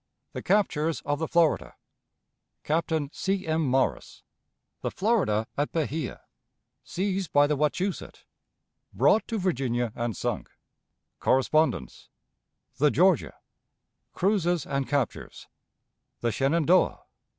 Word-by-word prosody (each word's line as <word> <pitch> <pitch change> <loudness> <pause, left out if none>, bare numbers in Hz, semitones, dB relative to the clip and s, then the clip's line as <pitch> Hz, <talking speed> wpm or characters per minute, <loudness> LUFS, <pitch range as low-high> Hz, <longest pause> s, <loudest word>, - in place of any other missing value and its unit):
The - - -5
Captures 165 -6 +1
of 145 0 -2
the 160 - -1
Florida. 170 -2 +1 0.9
Captain 155 -2 -1
C. 195 0 -2
M. 160 0 0
Morris. 130 0 -1 0.6
The - - -1
Florida 185 - +1
at 145 +1 -1
Bahia. 155 -3 -3 0.6
Seized 190 -1 -2
by 145 0 +5
the 150 +1 +1
Wachusett. 160 +4 -2 0.7
Brought 140 - +3
to 225 - -2
Virginia 125 - -1
and 120 -4 -3
sunk. - - -3 0.7
Correspondence. 135 - +1 0.7
The 150 +2 +4
Georgia. 175 0 +2 0.8
Cruises 175 -5 +1
and 140 -1 -2
Captures. 140 -6 -2 0.8
The 120 - +1
Shenandoah. 160 +8 +2
155 Hz, 105 wpm, -27 LUFS, 135-180 Hz, 0.9 s, by